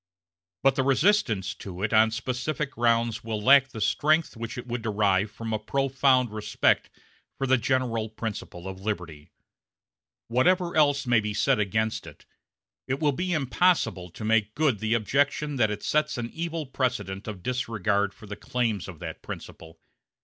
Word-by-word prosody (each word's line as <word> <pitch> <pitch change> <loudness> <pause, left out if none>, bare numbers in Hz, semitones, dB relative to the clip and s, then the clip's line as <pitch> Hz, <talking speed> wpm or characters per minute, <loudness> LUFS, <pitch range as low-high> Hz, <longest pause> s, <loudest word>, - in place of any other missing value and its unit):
But 135 0 +5
the 135 - 0
resistance 130 - +2
to 95 -1 -8
it 105 - 0
on 110 +1 +6
specific 130 +5 -3
grounds 115 -2 +1
will 110 -1 -3
lack 135 +4 +6
the 115 - -9
strength 155 +9 +2
which 115 0 -6
it 125 - -6
would 120 -1 -4
derive 105 -2 +1
from 115 +1 -6
a 110 - 0
profound 130 0 +2
respect 105 -1 +1 0.5
for 135 - -1
the 130 0 +4
general 115 -3 0
principle 105 -5 -6
of 95 0 -7
liberty; 90 -8 -5 1.0
whatever 170 +9 +2
else 145 -3 +3
may 120 -2 +4
be 105 -1 -3
said 105 - +2
against 110 +2 -1
it, - - -13 0.6
it 135 +1 -1
will 150 -2 +2
be 180 +6 -2
impossible 150 - +1
to 105 +5 -8
make 110 -1 +1
good 145 -9 +2
the 110 +1 +1
objection 140 +5 0
that 110 -3 +3
it 105 0 -5
sets 150 -2 +1
an 120 -1 -4
evil 165 -1 -3
precedent 125 -7 -2
of 100 -5 -7
disregard 110 -5 0
for 105 - -15
the 105 0 -7
claims 115 -4 -2
of 90 -4 -9
that - - -7
principle. 80 0 -9
115 Hz, 165 wpm, -26 LUFS, 105-135 Hz, 1.0 s, on